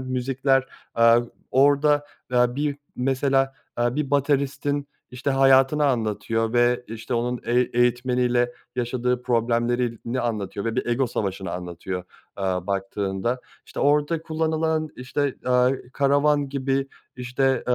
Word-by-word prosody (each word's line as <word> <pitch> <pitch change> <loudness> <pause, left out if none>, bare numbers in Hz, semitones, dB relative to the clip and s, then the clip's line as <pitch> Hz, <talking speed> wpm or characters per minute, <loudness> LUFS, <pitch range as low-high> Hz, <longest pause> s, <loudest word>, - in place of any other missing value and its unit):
müzikler, 130 +1 +1 0.3
aaa, 115 0 +6 0.3
orada, 145 +2 +4 0.3
aaa, 125 0 +3
bir 145 -1 -1 0.2
mesela, 135 +1 +1 0.2
aaa, 120 +2 0
bir 150 -3 -1
bateristin, 140 0 0 0.2
işte, 125 +3 -3
hayatını 135 +2 +4
anlatıyor 115 -2 0
ve, 120 0 +2
işte, 115 +3 -5
onun 120 +1 -1
eği 120 +2 +2
eğitmeniyle 125 0 +2 0.2
yaşadığı 125 0 -1
problemlerini 120 0 0
anlatıyor 105 -3 -3
ve 115 +1 -2
bir 130 - -1
ego 120 +2 +1
savaşını 95 -3 -3
anlatıyor, 90 +1 -5 0.3
eee, 100 - -2
baktığında. 95 +5 -2 0.3
İşte, - - -6
orada 150 +3 +2
kullanılan, 160 0 0
işte, 135 +2 -2
aaa, 125 0 +4 0.2
"Karavan" 145 +1 +2
gibi, 135 0 -1 0.3
işte, 130 +2 0
eee, 125 - +4
125 Hz, 120 wpm, -24 LUFS, 120-140 Hz, 0.3 s, aaa